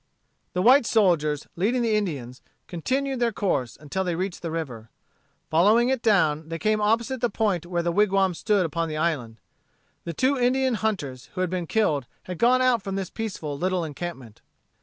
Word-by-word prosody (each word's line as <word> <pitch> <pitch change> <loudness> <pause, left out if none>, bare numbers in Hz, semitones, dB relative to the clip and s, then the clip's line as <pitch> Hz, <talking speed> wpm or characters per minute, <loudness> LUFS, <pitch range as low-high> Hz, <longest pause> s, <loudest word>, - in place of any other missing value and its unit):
The 180 - 0
white 255 +1 +6
soldiers, 155 -9 +2
leading 235 +8 +1
the 225 -2 +2
Indians, 145 - -3 0.2
continued 265 - -2
their 240 -1 +2
course 140 - -1
until 155 +6 -3
they 175 -2 -1
reached 185 +1 -3
the 170 - -4
river. 130 -9 -5 0.6
Following 210 +9 +4
it 265 -3 0
down, 160 -9 +2
they 165 - -3
came 215 +3 +1
opposite 230 +4 +1
the 240 - +2
point 200 -6 -1
where 175 -1 -1
the 170 - 0
wigwams 195 -2 +2
stood 205 -4 +2
upon 165 +1 -2
the 155 - -4
island. 140 -9 -2 0.6
The 170 - -5
two 260 - +1
Indian 255 +1 +2
hunters 185 - -3
who 185 - -2
had 185 -2 -1
been 180 -2 -2
killed 155 - +1 0.2
had 180 -2 -7
gone 255 +2 +4
out 250 -3 +3
from 195 0 -4
this 190 -2 -4
peaceful 190 -10 -4
little 180 +3 -1
encampment. 145 -7 -7
185 Hz, 180 wpm, -25 LUFS, 160-225 Hz, 0.6 s, white